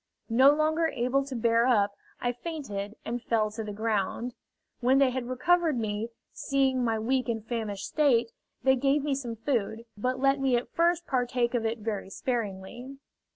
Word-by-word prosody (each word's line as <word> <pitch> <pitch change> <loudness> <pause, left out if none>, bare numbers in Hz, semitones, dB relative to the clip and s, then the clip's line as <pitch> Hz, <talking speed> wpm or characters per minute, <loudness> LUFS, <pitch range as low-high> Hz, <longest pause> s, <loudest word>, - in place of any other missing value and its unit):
No 260 +4 +7
longer 310 +2 +2
able 260 -1 0
to 270 -2 -6
bear 230 +1 +3
up, 205 -5 +3 0.2
I 245 - 0
fainted 240 -7 -5
and 240 +1 -3
fell 220 -2 +1
to 220 +1 -5
the 210 - -5
ground. 220 +3 -1 0.5
When 255 +2 +3
they 270 -2 +4
had 250 -1 -4
recovered 330 +3 +2
me, 215 0 -2 0.2
seeing 265 -2 +1
my 225 -2 +1
weak 250 +3 0
and 225 -2 -2
famished 215 -4 -3
state, 245 -7 +3 0.3
they 265 0 +5
gave 275 +2 +2
me 290 -1 0
some 245 -4 -3
food, 225 -1 -2
but 255 +5 -1
let 275 +1 +3
me 265 -2 +2
at 240 - -2
first 340 +1 +2
partake 245 -2 0
of 230 -2 +1
it 225 +1 -2
very 210 -3 -4
sparingly. 235 +3 -4
245 Hz, 175 wpm, -28 LUFS, 225-270 Hz, 0.5 s, No